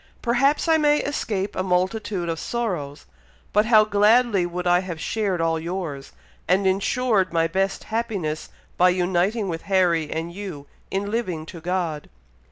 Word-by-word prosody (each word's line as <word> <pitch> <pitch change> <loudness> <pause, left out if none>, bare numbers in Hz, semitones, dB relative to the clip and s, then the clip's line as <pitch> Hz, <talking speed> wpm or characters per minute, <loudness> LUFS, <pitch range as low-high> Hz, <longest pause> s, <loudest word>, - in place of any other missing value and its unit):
Perhaps 275 +7 +2
I 325 -1 +5
may 295 -1 +3
escape 205 -8 -2
a - - 0
multitude 185 0 -1
of 165 -1 -2
sorrows, 175 -12 -3 0.5
but 210 +1 +3
how 215 -2 +7
gladly 210 -1 +3
would 180 +1 -5
I 175 0 +4
have 180 -3 -6
shared 200 -1 -1
all 165 0 +1
yours, 165 -5 -5 0.4
and 190 +3 +2
ensured 195 +1 +1
my 165 -1 +2
best 195 +4 -1
happiness 205 -9 -3 0.3
by 180 +1 +5
uniting 185 +4 +1
with 165 -2 -3
Harry 175 -5 +2
and 165 +2 -4
you 180 -7 -7 0.2
in 200 +1 -2
living 185 -9 -2
to 165 0 -10
God. 170 -3 -2
185 Hz, 155 wpm, -23 LUFS, 170-215 Hz, 0.5 s, how